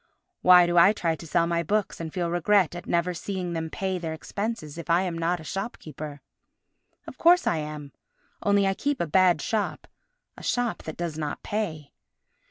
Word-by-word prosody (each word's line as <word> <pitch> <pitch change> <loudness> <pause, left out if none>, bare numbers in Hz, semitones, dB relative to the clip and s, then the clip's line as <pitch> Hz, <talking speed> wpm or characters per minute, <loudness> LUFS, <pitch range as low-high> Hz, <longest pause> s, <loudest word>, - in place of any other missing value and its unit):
Why 180 -1 +8
do 175 0 +3
I 195 +5 +7
try 170 -6 -1
to 165 - -11
sell 170 +2 +2
my 170 0 0
books 205 +5 -1
and 165 -1 -5
feel 175 -1 -2
regret 175 0 +3
at 175 - -8
never 175 +1 +1
seeing 180 0 -4
them 160 -1 -3
pay 190 +1 -2
their 165 -2 -4
expenses 170 -3 -5
if 170 - -9
I 170 +2 +4
am 180 -3 -3
not 170 +1 0
a - - -10
shopkeeper? 155 -6 -6 0.8
Of - - -11
course 355 +2 +5
I 165 - +1
am, 150 -2 -6 0.5
only 200 -1 +3
I 195 - +2
keep 285 +6 -2
a - - +1
bad 175 -1 +3
shop—a - - -5
shop 245 -2 -1
that 160 - -6
does 170 -3 -4
not 150 -2 -4
pay. 170 -9 -3
175 Hz, 185 wpm, -26 LUFS, 160-200 Hz, 0.8 s, Why